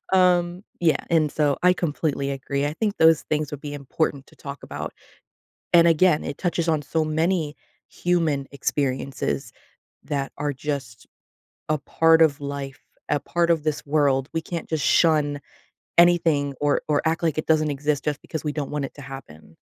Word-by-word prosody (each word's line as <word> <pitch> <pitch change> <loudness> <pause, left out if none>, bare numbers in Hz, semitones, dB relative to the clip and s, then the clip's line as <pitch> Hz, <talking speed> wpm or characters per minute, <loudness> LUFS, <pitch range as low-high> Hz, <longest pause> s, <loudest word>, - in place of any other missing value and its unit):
um, 180 0 +3 0.2
yeah. 165 -3 +2
And 155 -3 +3
so 145 -2 +1
I 180 0 +6
completely 150 -5 -2
agree. 140 +1 -2
I 150 - -3
think 210 +1 -1
those 160 -1 +5
things 150 -1 0
would 145 -1 -6
be 145 -1 -6
important 140 0 -2
to - - -20
talk 140 0 -8
about. - - -6 0.8
And, 170 -1 +7
again, 165 -1 +3
it - - -5
touches 170 -2 -1
on 155 -2 +1
so 160 +2 -1
many 155 0 0 0.3
human 165 -6 0
experiences 135 - -2 0.5
that 135 -2 -3
are 145 0 -1
just 135 -4 -5 0.6
a 155 0 +1
part 165 +3 +4
of 145 -3 +3
life, 140 -1 -5 0.3
a - - +2
part 170 +2 0
of 165 -3 +2
this 155 -1 -2
world. 140 -2 +2
We 165 - +1
can't 170 0 -5
just 155 -4 -1
shun 150 -3 +3 0.6
anything 165 -5 +4
or 145 -1 +2
or 150 -1 +2
act 165 +2 0
like 160 -2 0
it 155 - -2
doesn't 155 -1 +2
exist 145 0 -1
just 150 -1 -2
because 160 -2 -6
we 150 - -1
don't 145 -2 -4
want 150 -1 -2
it - - -15
to 145 - -11
happen. 80 - -11
150 Hz, 175 wpm, -24 LUFS, 140-165 Hz, 0.8 s, And